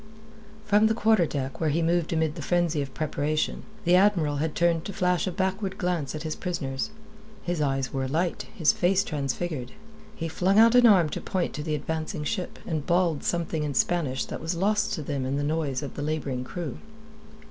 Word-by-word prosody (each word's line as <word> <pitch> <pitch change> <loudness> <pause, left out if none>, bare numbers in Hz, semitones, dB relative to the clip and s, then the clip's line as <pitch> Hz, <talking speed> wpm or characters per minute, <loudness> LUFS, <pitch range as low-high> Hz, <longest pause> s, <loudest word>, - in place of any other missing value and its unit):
From 210 +1 +4
the 220 - +1
quarter 220 -6 +3
deck, 135 -1 -4
where 160 - +2
he 165 +3 +1
moved 170 0 +1
amid 160 -2 +1
the - - -7
frenzy 175 -4 +1
of 135 -1 -5
preparation, 155 0 -1 0.2
the 175 - +4
Admiral 180 -7 +3
had 155 +1 -2
turned 170 -2 +2
to 200 - -5
flash 180 -3 +1
a - - 0
backward 190 +1 -2
glance 170 -6 -1
at 155 - -5
his 155 -1 -3
prisoners. 135 -7 -3 0.5
His 175 -3 -2
eyes 135 -2 0
were 135 -1 -1
alight, 165 +6 -1
his 165 -8 +4
face 190 +2 +2
transfigured. 145 -3 -3 0.4
He 165 - -3
flung 185 +5 +1
out 230 +1 +7
an 245 -1 +7
arm 185 -7 +5
to - - -4
point 185 -2 -2
to 150 - -4
the 155 0 -1
advancing 155 +1 -3
ship, 180 +3 -3
and 155 -3 -2
bawled 175 -3 +1
something 170 -2 -1
in 145 -2 -2
Spanish 135 -3 +1
that - - -6
was 165 +3 -2
lost 210 +4 +1
to 160 -7 -3
them 140 -2 -2
in 130 +1 -1
the 145 - -1
noise 150 -3 -1
of 140 - -6
the - - -6
labouring 145 -4 -2
crew. 165 +4 -5
160 Hz, 200 wpm, -26 LUFS, 145-180 Hz, 0.5 s, out